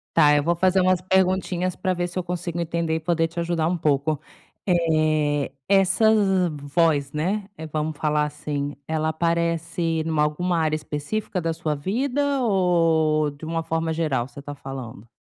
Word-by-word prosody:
Tá, 150 -3 +6
eu 145 - +3
vou 170 +4 +1
fazer 185 +2 +3
umas 185 -1 +3
perguntinhas 185 -1 +1
pra 185 -1 -1
ver 175 0 -2
se 180 - -5
eu - - 0
consigo 175 -1 -3
entender 170 -1 -1
e - - -3
poder 165 0 +1
te 170 - -10
ajudar 170 -1 0
um 180 - 0
pouco. 150 -1 0 0.5
Eh, 155 -5 +2 0.2
essa 195 +2 +3 0.5
voz, 145 0 +1
né, 190 +7 -1
eh, 160 - -7
vamos 155 0 -3
falar 150 -1 +1
assim, 145 -1 -4
ela 160 0 -1
aparece 165 0 0
numa 160 -2 +1
alguma 170 +4 0
área 155 -1 +1
específica 155 +7 -3
da 165 -1 -1
sua 160 -2 -2
vida, 270 - 0
ou 165 -7 +2
de 145 +2 -11
uma 165 0 -2
forma 165 0 -1
geral 145 -7 -1
você 140 +2 -11
tá 145 +1 -7
falando? 130 -5 -8
165 Hz, 170 wpm, -24 LUFS, 150-180 Hz, 0.5 s, Tá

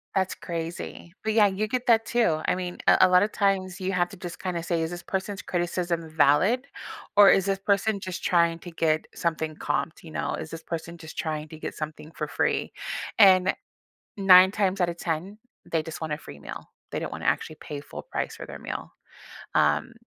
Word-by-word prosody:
That's 190 -1 +1
crazy, 170 0 -6
but, 220 0 0
yeah, 210 -2 +6
you 200 +2 -1
get 250 +3 -2
that 225 -1 +5
too. 220 -10 +2
I - - +3
mean, 180 -1 -4
a - - +7
a 185 - +7
lotta 180 +3 +5
times, 195 -3 0
you 185 - -1
have 175 -1 +1
to 195 - -11
just 175 -1 -7
kinda 180 -3 -2
say, 165 -1 -1
"Is 160 - -3
this 175 0 -6
person's 195 +1 -3
criticism 175 -1 -2
valid? 160 - +3 0.5
Or 205 -1 +9
is 195 0 +3
this 195 -1 +1
person 200 +1 +1
just 185 -1 -6
trying 170 -1 +3
to 175 - -9
get 160 -1 0
something 160 -2 -2
comped?" 160 - -2
you 160 - -11
know, - - -2
"Is 160 - -7
this 165 0 -7
person 170 +1 -6
just 160 -1 -10
trying 155 -4 -2
to 160 - -9
get - - -5
something 155 +1 -7
for - - -4
free?" - - 0 0.4
and 190 -3 +6 0.6
9 190 -2 +8
times 195 -2 0
outta 175 -1 +1
10, 175 +5 -3 0.3
they 160 -2 0
just 160 - -7
want 160 -2 -3
a 150 - -2
free 70 - -11
meal, - - -8 0.2
they - - -3
don't - - -4
wanna - - -6
actually 155 - 0
pay 145 -2 -7
full 145 - -9
price - - -4
for - - -7
their - - -8
meal, - - -6 0.6
um, - - +2
175 Hz, 205 wpm, -26 LUFS, 165-195 Hz, 0.6 s, Or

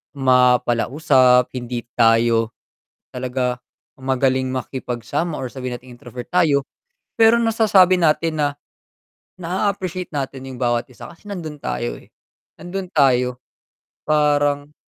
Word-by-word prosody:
ma 125 -2 +4
palausap, 125 0 +3
hindi 120 -1 -4 0.2
tayo 115 0 +3 0.6
talaga 125 -1 -2 0.4
magaling 130 0 0
makipag-sama, 130 +4 -3
or 130 - -4
sabihin 125 -2 -5
nating 125 0 -14
introvert 120 0 -9
tayo, 155 -6 +3 0.5
pero 225 +1 +6
nasasabi 210 -5 +4
natin 160 -1 +1
na, 150 - +2 0.9
naa-appreciate 185 0 -3
natin 135 -2 -5
yung 125 - -9
bawat 120 -1 +1
isa, 125 - -12
kasi 170 +5 -16
nandun 155 -6 -6
tayo, - - -3
eh, - - -22 0.5
nandun 180 +2 -6
tayo 125 -3 +2 0.7
parang 145 -1 +1
135 Hz, 115 wpm, -20 LUFS, 125-165 Hz, 0.9 s, pero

